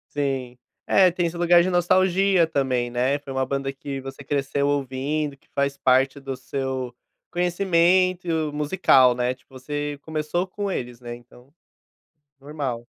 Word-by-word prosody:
Sim. 135 -4 -2 0.3
Eh, 185 -2 +5
tem 175 0 0
esse 170 +1 -6
lugar 175 0 +5
de 180 - 0
nostalgia 185 0 +3
também, 130 -5 0
né, 125 +4 0
foi 140 -1 -10
uma 130 0 0
banda 135 +1 -2
que 135 0 -6
você 135 +1 -9
cresceu 140 0 -1
ouvindo, 140 +1 -2
que - - -33
faz 140 0 0
parte 130 +2 +2
do 135 -1 -5
seu 130 -1 -4 0.3
conhecimento 175 -2 +2
musical, 145 -4 +4
né. 125 +1 -1
Tipo, 130 0 -16
você 145 +2 -4
começou 160 +4 -2
com 200 +1 -4
eles, 120 -7 -5
né, 120 -1 -7
então, 125 +3 -18 0.9
normal. 135 -5 -5
140 Hz, 150 wpm, -24 LUFS, 130-170 Hz, 0.9 s, Eh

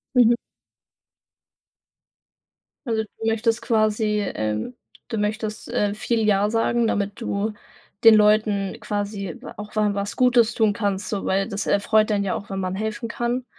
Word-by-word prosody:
Mhm. 240 -1 +6 2.5
Also, 220 -1 0
du 225 +1 -7
möchtest 225 +1 +1
quasi, 215 -1 +1
ähm 110 - -3 0.4
du 225 - -3
möchtest, 215 +2 -3
äh, 210 -4 0
viel 225 +1 -1
„Ja“ 205 0 +3
sagen, 230 +1 +1
damit 200 -1 -2
du 210 +2 -2 0.5
den 225 - +10
Leuten 210 -2 +3
quasi 200 -3 -4 0.2
auch 210 +1 -9
wa 210 -1 +2
was 200 0 -3
Gutes 240 -3 +4
tun 220 -2 +3
kannst. 205 -2 -2
So, 200 -2 -3
weil 195 +1 0
das 200 - -3
erfreut 215 +2 +3
einen 200 -1 +1
ja 190 - -1
auch, 200 - -6
wenn 195 - -3
man 185 0 -2
helfen 220 +3 -3
kann. 240 +2 -2
210 Hz, 150 wpm, -23 LUFS, 200-225 Hz, 2.5 s, den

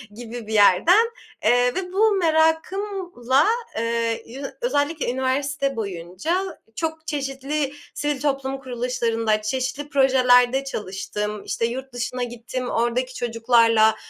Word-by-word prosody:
gibi 235 -1 -8
bir 220 - -4
yerden. 315 - +5 0.3
Eee, 245 0 +3
ve 370 -1 -4
bu 430 +2 +4
merakımla, 320 - +1 0.3
eee, 230 0 -1
yü 260 +4 -9 0.2
özellikle 305 - 0
üniversite 275 +2 -1
boyunca 210 - -3 0.2
çok 320 +2 -4
çeşitli 280 0 -2 0.2
sivil 295 -1 -2
toplum 270 -2 -1
kuruluşlarında, 235 -4 -1
çeşitli 260 +6 -3
projelerde 260 -1 +4
çalıştım. 210 -3 -4
İşte, 230 - -1
yurt 260 +2 -5
dışına 245 +1 -3
gittim, 245 +1 -5
oradaki 240 +2 0
çocuklarla, 230 -2 +3
255 Hz, 110 wpm, -23 LUFS, 230-290 Hz, 0.3 s, yerden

